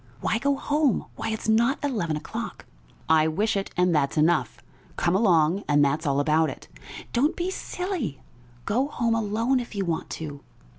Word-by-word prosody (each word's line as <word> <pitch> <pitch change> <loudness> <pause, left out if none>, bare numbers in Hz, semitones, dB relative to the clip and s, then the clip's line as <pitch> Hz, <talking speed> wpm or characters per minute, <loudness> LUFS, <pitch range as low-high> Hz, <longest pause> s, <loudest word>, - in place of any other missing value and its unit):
"Why 220 - 0
go 280 +2 +1
home? 290 -1 +1
Why, - - -3
it's 220 0 -3
not 235 +5 +3
eleven 205 - -1
o'clock." - - -6 0.4
"I 160 0 +4
wish 205 +8 0
it, 195 0 -2
and 180 -1 +3
that's 145 -1 +1
enough. 150 -8 +2 0.4
Come 175 +1 +1
along, 185 -3 +3
and 145 -1 +4
that's 150 +3 0
all 140 0 +2
about 155 +2 +2
it." - - -9 0.5
"Don't 275 +6 +2
be 360 +2 -2
silly! 360 - -4 0.5
Go 250 +7 +1
home 235 -5 0
alone 225 +4 +1
if 235 -3 -7
you 195 -1 -1
want 165 -2 -2
to." 145 -3 -7
195 Hz, 170 wpm, -25 LUFS, 155-240 Hz, 0.5 s, I